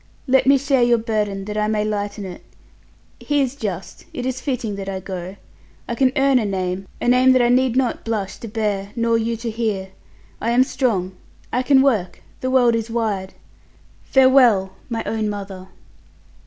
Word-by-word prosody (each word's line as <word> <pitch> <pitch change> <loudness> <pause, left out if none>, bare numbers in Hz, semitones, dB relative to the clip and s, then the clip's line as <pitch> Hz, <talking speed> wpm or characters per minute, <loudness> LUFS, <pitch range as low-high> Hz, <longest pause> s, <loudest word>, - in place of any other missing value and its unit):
Let 265 -1 +3
me 275 0 +6
share 270 -1 +1
your 240 0 +4
burden 210 -4 -2
that 210 +1 -3
I 210 - +1
may 210 -1 0
lighten 205 -1 -3
it. 180 -2 -9 0.8
He 290 -1 0
is 270 -1 0
just. 195 -8 -6
It 250 - -4
is 260 0 -3
fitting 245 -7 -2
that 195 0 -5
I 190 -1 -3
go. 185 0 -6 0.5
I - - -2
can 255 +2 +2
earn 270 -1 +4
a - - -1
name 190 -1 -3
a - - -3
name 255 +1 +5
that 255 - +4
I 240 - +3
need 250 0 +3
not 255 -2 0
blush 210 -4 -3
to 230 - -8
bear 205 -2 -2
nor 230 -1 +1
you 230 0 0
to 230 0 -4
hear. 215 -4 -2 0.5
I 230 - 0
am 245 +2 +5
strong. 220 -9 -1 0.4
I 250 - +2
can 265 +1 +4
work. 215 -10 0 0.2
The 255 - -2
world 250 -2 +4
is 230 0 -2
wide. 210 -5 -2 0.7
Farewell! 255 -8 +4 0.2
my 230 -2 -2
own 220 -1 -1
mother!" 195 -2 -7
225 Hz, 185 wpm, -21 LUFS, 200-255 Hz, 0.8 s, me